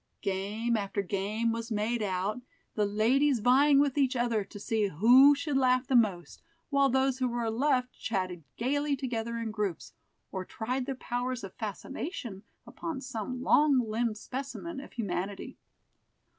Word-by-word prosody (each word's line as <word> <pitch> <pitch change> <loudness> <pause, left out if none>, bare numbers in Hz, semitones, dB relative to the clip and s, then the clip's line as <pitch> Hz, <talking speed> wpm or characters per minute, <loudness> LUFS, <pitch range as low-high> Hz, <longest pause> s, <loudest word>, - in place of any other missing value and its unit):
Game 205 +4 -1
after 200 -1 -2
game 210 +4 -1
was 230 +1 -4
made 220 +2 0
out, 200 +3 -1 0.3
the 210 -2 +1
ladies 250 +7 +3
vying 265 +6 +5
with 285 0 +2
each 265 -2 +2
other 235 -3 +1
to 205 - -11
see 215 0 0
who 245 - +7
should 285 0 -1
laugh 255 -1 +3
the 260 - 0
most, 200 -7 +1 0.3
while 280 -1 +4
those 265 0 +1
who 255 - +1
were 235 -2 -1
left 250 +1 +1
chatted 185 -5 -2
gayly 285 +4 0
together 235 -3 -3
in 230 -1 -3
groups, 205 -6 -3 0.4
or 190 -1 -3
tried 250 +7 -3
their 270 - -2
powers 250 0 -3
of 195 - -7
fascination 225 - -6 0.2
upon 330 -5 -5
some 255 -1 -5
long 295 -2 +4
limbed 220 0 -1
specimen 275 +7 -6
of 280 - -11
humanity. 200 -3 -4
235 Hz, 155 wpm, -29 LUFS, 210-265 Hz, 0.4 s, who